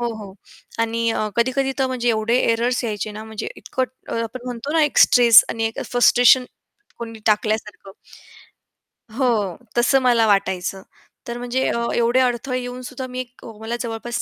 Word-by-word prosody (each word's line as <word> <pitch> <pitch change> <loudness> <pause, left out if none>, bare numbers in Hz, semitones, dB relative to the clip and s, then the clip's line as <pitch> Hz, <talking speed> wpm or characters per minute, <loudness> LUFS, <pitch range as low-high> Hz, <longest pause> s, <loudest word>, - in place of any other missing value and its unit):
हो, 240 - -1
हो. 200 -3 -9 0.5
आणि 230 0 0
अ, 215 -1 -1
कधी-कधी 260 +3 +1
तर 265 - +2
म्हणजे 255 -2 -2
एवढे 225 +1 +1
एररर्स 240 +2 0
यायचे 210 -1 -3
ना 215 +1 -8
म्हणजे 220 -1 -6
इतकं 260 - -3 0.4
आपण 230 +2 -6
म्हणतो 250 +4 -5
ना 325 - +3
एक 295 - 0
स्ट्रेस 235 -2 +7
आणि 225 0 -2
एक 225 - -5
फ्रस्ट्रेशन 245 +1 +5 0.5
कोणी 230 -1 -7
टाकल्यासारखं. 210 -2 -1 1.3
हो, 225 -8 0 0.2
तसं 260 +3 +4
मला 240 -3 +3
वाटायचं. 190 -2 0 0.5
तर 235 0 -5
म्हणजे 245 +1 -2 0.4
एवढे 240 +2 +2
अडथळे 255 +1 0
येऊन 250 0 -7
सुद्धा 255 +1 -7
मी 255 0 -6
एक 250 0 -9
मला 225 +2 -4
जवळपास 235 0 -4
235 Hz, 155 wpm, -21 LUFS, 220-250 Hz, 1.3 s, स्ट्रेस